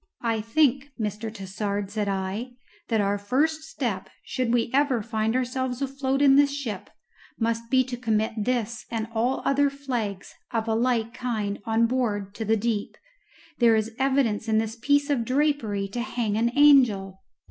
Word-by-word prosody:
"I 225 -2 0
think, 275 +4 +2
Mr. 215 +1 -3
Tassard," 200 0 -4
said 210 -1 -2
I, 195 +6 -3 0.3
"that 225 -2 +1
our 200 0 0
first 290 +10 +1
step, 245 -11 -4
should 250 -2 -2
we 235 -1 +1
ever 270 -5 +2
find 220 +2 -1
ourselves 255 0 -1
afloat 270 0 -1
in 275 -1 +6
this 285 0 +5
ship, 255 -9 -5 0.5
must 230 0 -1
be 260 0 +4
to 250 -1 -6
commit 220 -2 0
this 235 0 -2
and 225 -1 -2
all 240 +4 0
other 285 +1 +3
flags 245 -9 -4 0.2
of 225 -2 -2
a 225 - +1
like 230 -1 +1
kind 215 -5 -3
on 225 0 +3
board 215 -5 -1
to 220 - -5
the 220 +1 +2
deep. 215 -1 -2 0.6
There 235 -2 +5
is 220 +1 -1
evidence 265 -5 +1
in 220 -1 +2
this 220 0 -1
piece 285 +4 +2
of 255 -5 +1
drapery 255 -7 0
to 240 +4 -3
hang 235 -4 -2
an 230 +2 +2
angel." 225 -10 +5
230 Hz, 170 wpm, -25 LUFS, 215-260 Hz, 0.6 s, in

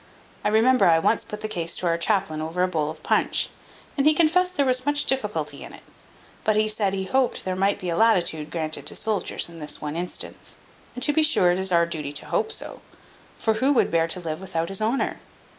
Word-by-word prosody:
I - - +1
remember 225 -1 +4
I 165 -1 +5
once 185 +7 +1
put 210 0 -8
the 215 - -3
case 170 -5 -2
to - - -4
our 170 -1 +2
chaplain 170 -5 0
over 165 +3 -1
a - - +3
bowl 155 -4 -1
of 155 - -9
punch, - - +1 0.5
and 280 0 +2
he 310 - +5
confessed 360 +3 +3
there 280 - +3
was 255 -1 +1
much 290 +1 +1
difficulty 265 0 -2
in - - -10
it; - - -14 0.6
but 215 - +2
he 215 0 +2
said, 210 -2 0
he 190 - -2
hoped 260 +6 0
there 185 -1 -1
might 195 +2 +1
be 185 -3 -5
a - - -1
latitude 175 -8 +2
granted 155 -1 -3
to - - 0
soldiers 215 -2 -1
in 170 -1 -12
this 150 -1 -3
one 150 0 -5
instance; 175 +1 -4 0.4
and 250 - -2
to 295 - +3
be 315 - +3
sure 185 -12 +4
it 180 - 0
is 190 0 -1
our 170 -1 +4
duty 150 -4 -4
to 145 - -4
hope 445 - -1
so; - - -6 0.6
for 220 - +1
who 260 +6 +1
would 255 - +2
bear 165 -1 +2
to 165 - -2
live 160 -1 -5
without 165 -2 -3
his 195 +1 -3
honour? 230 +5 -1
190 Hz, 235 wpm, -24 LUFS, 165-250 Hz, 0.6 s, I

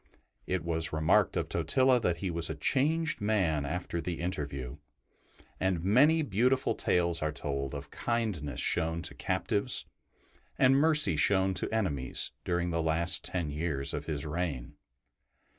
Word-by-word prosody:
It 95 -3 -1
was 80 -1 +1
remarked 80 0 +2
of - - -1
Totila 125 +10 +2
that 90 -7 0
he 95 -1 -3
was 85 0 0
a 80 - -3
changed 150 - 0
man 95 -9 +1
after 85 +2 -3
the 85 -1 -4
interview, 70 -8 -4 0.8
and 95 -3 0
many 145 - +4
beautiful 130 +3 +1
tales 85 -1 0
are 75 0 0
told 70 -2 -4
of 70 0 -8
kindness 105 - -2
shown 80 +1 0
to 85 - -6
captives 100 +5 -1 0.7
and 130 +1 +5
mercy 150 - +5
shown 95 +4 +3
to 90 - -3
enemies 80 -13 0
during 85 0 -1
the 85 0 0
last 80 +2 +1
ten 85 -5 -3
years 70 -3 -2
of - - -4
his 75 -1 -4
reign. 75 -5 -4
85 Hz, 145 wpm, -30 LUFS, 75-105 Hz, 0.8 s, and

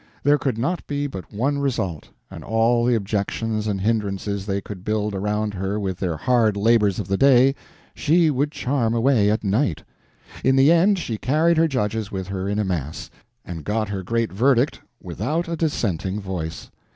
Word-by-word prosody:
There 145 +1 +4
could 130 -5 -1
not 165 +9 -2
be 145 0 -2
but 95 -10 -7
one 135 +7 0
result: 100 - -2 0.3
all 115 +1 +2
the 120 -1 +3
objections 110 +1 -2
and 100 -2 -1
hindrances 100 -2 -1
they 100 -1 0
could 95 -2 -9
build 105 0 -1
around 105 +2 -1
her 95 +2 -2
with 95 -3 -3
their 85 -4 -2
hard 115 -3 +2
labors 105 -2 +3
of 105 - -4
the 95 - 0
day 135 +1 +5 0.4
she 160 +1 +3
would 145 +2 0
charm 125 -6 -1
away 115 -3 +3
at 110 +1 0
night. 100 - 0 0.6
In 130 +1 +4
the 135 +3 +5
end, 185 +4 +4
she 115 -11 -3
carried 160 +6 +2
her 165 +1 +4
judges 110 -6 -2
with 95 -1 -5
her 95 0 -3
in 105 - -1
a 105 - 0
mass, 80 -5 -4 0.3
and 80 -3 -7
got 110 +5 -1
her 100 -2 -3
great 115 +4 -1
verdict 125 +5 +2 0.2
without 125 - -2
a 170 - -2
dissenting 105 - -1
voice. 90 -5 -5
110 Hz, 180 wpm, -22 LUFS, 100-135 Hz, 0.6 s, day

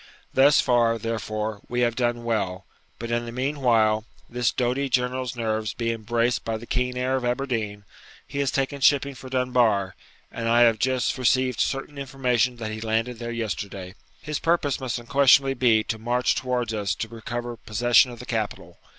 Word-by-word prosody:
Thus 140 +2 +6
far, 120 -2 +3
therefore, 110 -1 -3
we 125 0 -1
have 120 -1 +1
done 120 -1 -1
well; 100 -5 -2 0.3
but, 115 0 -6
in 120 0 -1
the - - -5
meanwhile, 120 -5 +1 0.2
this 120 -1 0
doughty 130 +3 -1
general's 125 0 -1
nerves 110 -3 -2
being 115 -1 -2
braced 120 +2 0
by 115 -1 -2
the 115 - -10
keen 125 +1 -1
air 130 +1 0
of 130 - -4
Aberdeen, 120 -5 -2 0.4
he 140 - -5
has 140 -1 +1
taken 135 +1 -2
shipping 140 0 +3
for 130 0 -11
Dunbar, 120 -7 +1 0.4
and 115 -1 -3
I 120 +1 +4
have 115 -2 +5
just 130 +1 +1
received 130 -2 +2
certain 135 +6 -2
information 125 -3 0
that 110 -2 -5
he 110 0 -6
landed 115 +2 -1
there 120 -1 -5
yesterday. 100 -5 -4 0.3
His 150 -1 -3
purpose 165 -5 +1
must 130 -3 -3
unquestionably 135 +2 +4
be 120 -4 +3
to 110 - -4
march 120 +2 +1
towards 125 -3 -2
us 105 -2 -1
to 115 - -4
recover 120 +1 -5
possession 120 +1 +3
of 120 - -9
the 125 - -9
capital. 110 -4 -4
120 Hz, 175 wpm, -25 LUFS, 110-130 Hz, 0.4 s, Thus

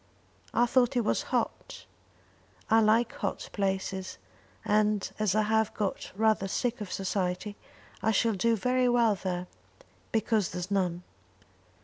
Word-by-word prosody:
"I 240 - +3
thought 250 +1 +2
it 235 - +1
was - - +1
hot." - - -3 0.9
"I 225 - +7
like 225 +2 +3
hot - - -4
places; 190 -1 -2 0.5
and 210 -1 +2
as 210 -2 +1
I 215 - +3
have 220 0 +1
got 205 -3 -3
rather 215 -2 +2
sick 240 +4 -2
of 200 - -6
society 190 +1 -2 0.5
I 220 - +1
shall 225 +1 +2
do 230 +4 +2
very 250 +3 +1
well 235 -3 +4
there, 180 -2 -3 0.7
because 220 -3 +1
there's 180 +2 -5
none. 180 -3 0
215 Hz, 135 wpm, -29 LUFS, 190-225 Hz, 0.9 s, I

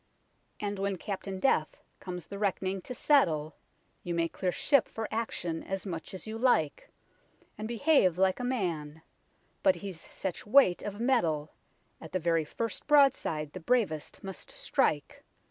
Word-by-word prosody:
And 205 -1 -3
when 195 0 0
Captain 195 0 -5
Death 160 -10 +2 0.2
comes 180 -3 -6
the 200 +4 -8
reck'ning 195 -1 -1
to 250 - -5
settle. 160 - +3 0.5
You 175 -1 -3
may 165 0 +2
clear 180 +2 -2
ship 280 +7 +3
for 225 -1 -4
action 175 -7 -2
as 195 +1 -4
much 170 0 -5
as 185 - -7
you 220 +1 -5
like, 195 - +2 0.7
And 215 +1 -5
behave 235 - +3
like 190 +2 +3
a - - -3
man; 165 - -2 0.6
b'ut 285 -1 +5
he's 190 -5 -8
such 190 +1 -5
weight 220 -6 +5
of 205 0 -5
metal. 170 - +1 0.5
At 160 - -10
the 185 - +1
very 165 -2 +1
first 230 +8 -4
broadside 270 - +3
the 185 - -6
bravest 185 -6 0
must 190 -1 -7
strike. - - -1
190 Hz, 155 wpm, -30 LUFS, 165-230 Hz, 0.7 s, b'ut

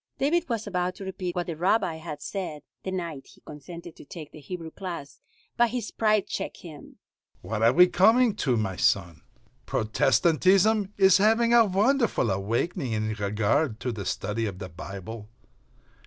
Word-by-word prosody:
David 330 +4 +1
was 230 -2 -2
about 180 -2 -2
to 195 - -8
repeat 185 -2 -4
what 175 -1 -1
the 165 - -4
Rabbi 175 0 +1
had 155 -2 -8
said 175 -7 -5 0.2
the - - -5
night 170 -7 -5
he - - -19
consented 170 +3 -10
to - - -12
take 150 +1 -10
the - - -12
Hebrew 165 +2 -7
class, 170 -7 -7 0.4
but 240 0 +4
his 235 -2 -4
pride 215 -2 +2
checked - - -5
him: 155 -4 -12 0.5
"What 110 -1 -3
are 115 +1 +6
we 180 +7 +7
coming 220 +5 +4
to, 130 - +1
my 95 -4 -2
son? 85 -1 +1 0.5
Protestantism 185 - +2
is 190 -1 +6
having 225 +3 +3
a 235 -1 +7
wonderful 215 - +2
awakening 115 - -1
in 110 0 -1
regard 105 +5 0
to 125 - -2
the 100 -5 -5
study 105 +3 -2
of 95 -3 -6
the 95 -1 -7
Bible. 100 +5 -8
170 Hz, 170 wpm, -26 LUFS, -, 0.5 s, we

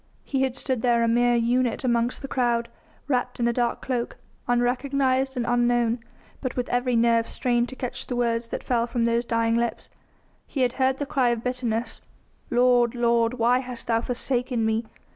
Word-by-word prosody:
He 270 -2 -1
had 265 -2 0
stood 260 -4 -2
there 235 -1 +3
a - - +2
mere 240 +1 +3
unit 240 +1 +1
amongst 240 0 0
the - - -4
crowd, 240 -3 0 0.4
wrapped 250 -3 -1
in 235 - +2
a 235 - +1
dark 240 0 -1
cloak, 245 -2 -3 0.3
unrecognised 260 +2 +1
and 240 - 0
unknown, 240 -1 +2 0.4
but 255 -2 -3
with 250 -1 -2
every 245 0 +1
nerve 230 0 +3
strained 240 -1 0
to 260 - -8
catch 250 -2 -5
the 250 - -3
words 235 -1 0
that - - -5
fell 235 -2 0
from 235 -1 0
those 235 +1 +1
dying 230 -1 +1
lips. 235 0 -2 0.6
He 275 - -3
had 250 -1 +2
heard 260 0 +3
the 285 - -3
cry 265 -3 +1
of 235 -1 -1
bitterness: 245 -2 -2 0.5
"Lord! 245 -1 +3
Lord! 235 0 +2
why 245 +1 +3
hast 250 -2 -7
Thou 230 -1 +1
forsaken 245 -1 -1
Me?" 220 +1 0
240 Hz, 185 wpm, -25 LUFS, 235-250 Hz, 0.6 s, there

